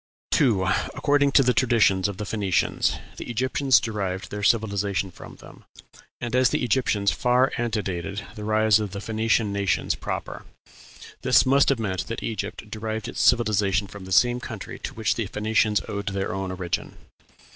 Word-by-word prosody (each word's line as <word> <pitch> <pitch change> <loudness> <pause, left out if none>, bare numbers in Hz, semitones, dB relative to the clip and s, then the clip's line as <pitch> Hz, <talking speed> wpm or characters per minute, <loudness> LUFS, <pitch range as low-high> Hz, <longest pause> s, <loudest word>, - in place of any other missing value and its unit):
2. 115 -10 +3 0.3
According 145 -1 +2
to 135 - +6
the 125 0 +3
traditions 110 -7 +3
of 100 -2 -6
the 105 - -4
Phoenicians, 100 -3 0 0.2
the - - -7
Egyptians 130 +2 +2
derived 100 -4 -4
their 105 - -4
civilization 100 -3 +1
from - - -12
them; - - -15 0.6
and 120 0 -3
as 130 -1 +4
the - - -1
Egyptians 105 -4 +1
far 125 +2 +2
antedated 100 -4 -3
the 105 - -8
rise 110 0 +3
of 105 -3 -4
the 100 - -4
Phoenician 110 0 0
nations 100 -2 0
proper, - - -5 0.8
this - - +4
must 135 +1 +4
have 140 - +2
meant 95 -5 -3
that 115 - -5
Egypt 105 -1 -5
derived 110 0 -4
its - - -4
civilization 105 -5 +3
from 100 -1 -11
the 95 - -10
same 120 +5 +4
country - - -8
to - - -7
which 110 -4 +1
the 115 -4 -3
Phoenicians 105 +1 +1
owed 100 -1 -5
their 100 +1 -2
own 95 -1 -3
origin. 90 -2 -4
105 Hz, 165 wpm, -24 LUFS, 100-120 Hz, 0.8 s, to